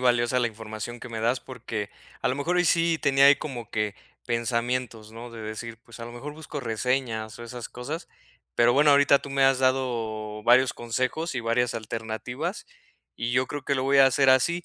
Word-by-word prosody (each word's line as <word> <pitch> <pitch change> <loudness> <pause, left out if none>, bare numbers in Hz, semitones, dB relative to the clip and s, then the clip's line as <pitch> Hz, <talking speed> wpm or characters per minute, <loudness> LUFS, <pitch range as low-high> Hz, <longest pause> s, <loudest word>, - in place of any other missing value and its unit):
valiosa 120 0 +2
la 120 -1 +2
información 110 +2 -7
que - - -8
me 115 -1 -5
das, 120 +3 +1
porque, 115 -5 -5 0.3
a - - +1
lo 130 - 0
mejor 165 +6 -1
hoy 180 -1 +3
sí 165 0 +3
tenía 135 0 +4
ahí 140 0 +8
como 120 -7 -7
que 105 -1 -1 0.3
pensamientos, 115 -1 -2
¿no?, 120 +1 -9
de 115 -1 -9
decir, 110 +1 -6
pues, 115 0 -13
a 115 - -6
lo 120 - -9
mejor 145 +5 -7
busco 155 -2 -7
reseñas 115 -1 -2
o - - -8
esas 120 0 -7
cosas, 145 +8 -6 0.5
pero 120 +1 +4
bueno, 145 +1 +5
ahorita 140 0 +5
tú 140 - -9
me 135 0 +3
has 135 -1 +4
dado 115 -5 -1
varios 125 +3 +5
consejos 130 +7 -2
y 125 - -1
varias 115 +1 +1
alternativas, 115 - -5 0.5
y 115 +1 -2
yo 125 +1 +2
creo 145 -2 -6
que 140 - +1
lo 130 - 0
voy 140 +1 +3
a 135 - +9
hacer 135 +1 +3
así. 170 +7 +3
125 Hz, 205 wpm, -26 LUFS, 115-135 Hz, 0.5 s, a